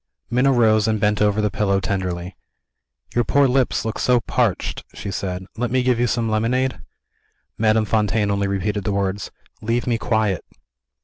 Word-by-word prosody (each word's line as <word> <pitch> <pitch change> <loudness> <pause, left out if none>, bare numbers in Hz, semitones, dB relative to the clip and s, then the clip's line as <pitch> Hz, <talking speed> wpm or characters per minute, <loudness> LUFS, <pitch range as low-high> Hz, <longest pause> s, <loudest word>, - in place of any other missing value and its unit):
Minna 125 +3 +3
rose 110 -3 +3
and 110 -1 +1
bent 105 0 +1
over 105 0 +2
the 105 -1 0
pillow 100 -2 +1
tenderly. 95 -2 -3 0.8
"Your 120 - +2
poor 140 +6 +3
lips 130 -3 +1
look 110 - -3
so 125 -1 +3
parched," - - -1
she 100 - -5
said; 95 -1 -4
"let 120 +1 -1
me 130 0 +1
give 125 -2 +2
you 120 - +2
some 115 -1 0
lemonade?" 120 +4 0 0.8
Madame 110 0 +3
Fontaine 105 -1 +1
only 100 0 0
repeated 100 +1 -1
the 105 - -1
words, 100 0 -2 0.3
"Leave 115 +2 -1
me 120 -2 0
quiet." 110 -7 0
110 Hz, 170 wpm, -21 LUFS, 100-120 Hz, 0.8 s, Minna